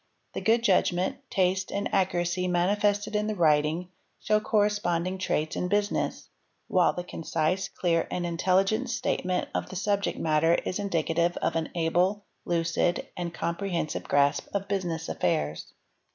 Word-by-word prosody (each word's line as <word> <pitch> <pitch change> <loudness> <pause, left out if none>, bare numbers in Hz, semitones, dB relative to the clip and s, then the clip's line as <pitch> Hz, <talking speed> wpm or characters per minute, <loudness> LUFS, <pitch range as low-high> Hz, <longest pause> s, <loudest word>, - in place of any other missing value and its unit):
The - - -4
good 230 +1 +3
judgment, 185 +3 +2
taste 190 -2 +1
and 200 - -1
accuracy 180 -1 +1
manifested 205 +4 +1
in 210 0 +1
the 215 - -1
writing 160 +1 +2 0.3
show 215 0 +2
corresponding 205 -6 0
traits 155 -4 -1
17 180 - -2
business; 205 +1 -1 0.4
while 180 -2 +3
the 180 - -4
concise, 165 +2 -1
clear, 165 -2 0
and 175 - -2
intelligent 190 +8 +1
statement 185 -6 -1
of - - -1
th 185 - -5
subject 200 0 0
matter 160 +1 +3
is 185 - -2
indicative 170 -3 0
of 165 - -1
an 160 -1 -1
able, 180 +5 +1 0.2
lucid, 170 0 0
and 175 -1 -3
comprehensive 170 0 -2
grasp 145 0 +2
¢ 200 0 -1
business 175 -5 -2
affairs. 75 -3 -1
180 Hz, 140 wpm, -27 LUFS, 165-200 Hz, 0.4 s, good